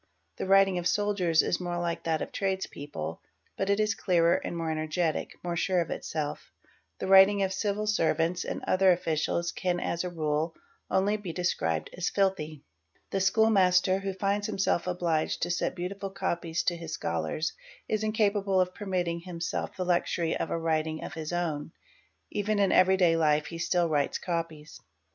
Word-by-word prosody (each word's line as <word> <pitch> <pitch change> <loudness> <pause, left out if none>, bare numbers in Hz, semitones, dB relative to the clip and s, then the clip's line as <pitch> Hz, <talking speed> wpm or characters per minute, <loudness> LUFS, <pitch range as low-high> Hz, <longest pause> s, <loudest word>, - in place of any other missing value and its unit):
The - - -3
writing 195 -1 +5
of 175 - 0
soldiers 185 -4 +2
is 175 - 0
more 175 -1 -3
like 170 -1 -3
that 160 -1 0
of - - -8
trades 190 -1 -1
pple 145 - -6 0.4
but 195 - -2
it 200 +1 +2
is 215 +1 +2
clearer 170 -5 +3
and 170 - -2
more 165 -1 -2
energetic,—more 160 +2 -2
sure 180 +2 +1
of 170 - -2
itself. 150 -1 -4 0.5
The - - -4
f 190 - -2
iting 195 +1 +7
of 190 - -3
civil 210 +1 -1
servants 175 -4 +1
and - - -5
other 190 0 +4
officials 170 0 0
can 180 -2 -1
as 170 0 -2
a 180 - -3
rule 155 -1 -1 0.3
only 200 +3 +2
be 200 -5 -6
des 180 +2 -4 0.2
wibed 80 -1 -1
as 180 0 -1
"filthy." 175 -7 -1 0.5
The 195 - 0
school 220 +4 +4
master, 185 -1 +4
who 195 0 -3
finds 200 +1 0
himself 190 -2 0
obliged 170 -3 0
to - - 0
set 175 - -1
beautiful 195 +2 -4
copies 170 -3 -2
to 180 -3 +1
his 165 -1 -7
scholars, 85 - -2 0.3
is 215 0 -1
incapable 205 -3 +1
of 185 0 +1
permitting 180 -5 -2
himself 170 -1 -4
the 185 - -2
wm - - -5
Qos - - -9
SE - - -2
BE 165 - +1
Xury - - -1
of - - -2
a - - -1
writing 160 -1 -1
of - - -6
his 160 0 -5
own; 160 -3 -2 0.6
even 210 +1 0
in 200 -2 +3
everyday 185 -2 +5
life 150 -2 +2
he 165 +2 -7
still 175 0 +1
writes 145 -3 0
= - - -15
es. 165 -3 -4
175 Hz, 190 wpm, -28 LUFS, 165-195 Hz, 0.6 s, iting